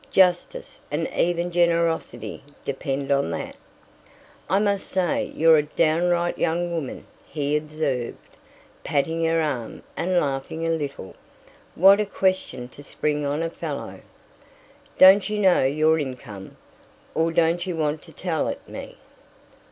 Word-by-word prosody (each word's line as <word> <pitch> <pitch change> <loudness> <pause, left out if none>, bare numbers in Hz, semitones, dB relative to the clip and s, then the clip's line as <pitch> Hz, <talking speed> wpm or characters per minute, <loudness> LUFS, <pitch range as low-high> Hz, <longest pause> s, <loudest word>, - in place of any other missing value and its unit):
Justice, 185 - +1
and - - -1
even 175 0 0
generosity, 170 -9 0 0.2
depend 140 0 -3
on 140 -10 +2
that." 85 - -5 0.9
"I 190 - +3
must 200 -1 0
say 185 -3 0
you're 165 0 +6
a - - +4
downright 170 +3 +1
young 175 +1 0
woman," 155 -6 -5 0.2
he 145 -1 -1
observed, 150 -5 -2 0.7
patting 160 +4 0
her 165 0 +2
arm 140 -8 -3
and 180 0 +1
laughing 140 +3 -3
a 165 - +1
little. 145 -11 -4 0.6
"What 195 +4 +7
a 210 - 0
question 185 -11 -1
to 140 - -13
spring 150 0 -2
on 145 +3 -1
a 165 - -1
fellow!" 155 -5 -6 1.0
"Don't 190 +2 +7
you 210 - -2
know 190 -8 +4
your 155 +3 +3
income? 120 -8 -7 0.6
Or 165 +1 +1
don't 170 +1 +2
you 180 - -2
want 155 0 -1
to 165 - -15
tell 160 0 -2
it - - -5
me?" - - -9
160 Hz, 135 wpm, -24 LUFS, 145-175 Hz, 1.0 s, What